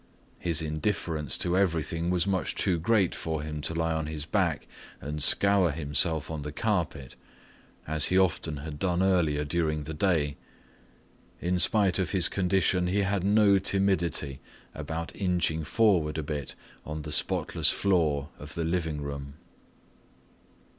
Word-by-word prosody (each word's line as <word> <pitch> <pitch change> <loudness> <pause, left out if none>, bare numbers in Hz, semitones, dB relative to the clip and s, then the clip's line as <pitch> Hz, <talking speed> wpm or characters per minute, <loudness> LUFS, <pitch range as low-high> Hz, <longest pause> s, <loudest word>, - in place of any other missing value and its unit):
His 85 -2 +1
indifference 80 -1 -2
to 90 0 0
everything 85 -2 0
was 90 -1 +1
much 95 -2 -1
too 90 -4 +1
great 100 0 +2
for 80 -2 -4
him 75 -1 -5
to 80 - -3
lie 80 0 0
on 80 -1 -2
his 75 -1 -5
back - - -1 0.3
and 75 +1 -5
scour 100 +3 +4
himself 80 +1 -1
on 80 -2 -4
the 75 +1 -5
carpet, 85 - -2 0.7
as 80 -1 +5
he 95 - +2
often 85 -4 +1
had 75 -2 -7
done 90 +1 +1
earlier 80 -6 +1
during 75 -1 -1
the 80 +2 -6
day. 75 -4 0 1.0
In 90 +1 -1
spite 100 -1 +3
of 95 0 -1
his 90 -3 +4
condition 90 -1 +1
he 100 +3 +1
had 100 -1 -1
no 100 -1 +4
timidity 85 -8 0 0.3
about 80 +3 -5
inching 90 -4 0
forward 90 -6 +2
a 80 - -2
bit 70 -1 -5 0.3
on 75 0 -6
the 75 - -6
spotless - - +1
floor 80 -7 +1
of 75 +1 -10
the 85 - -2
living 80 -3 -2
room. 70 -1 -6
80 Hz, 150 wpm, -28 LUFS, 75-95 Hz, 1.0 s, as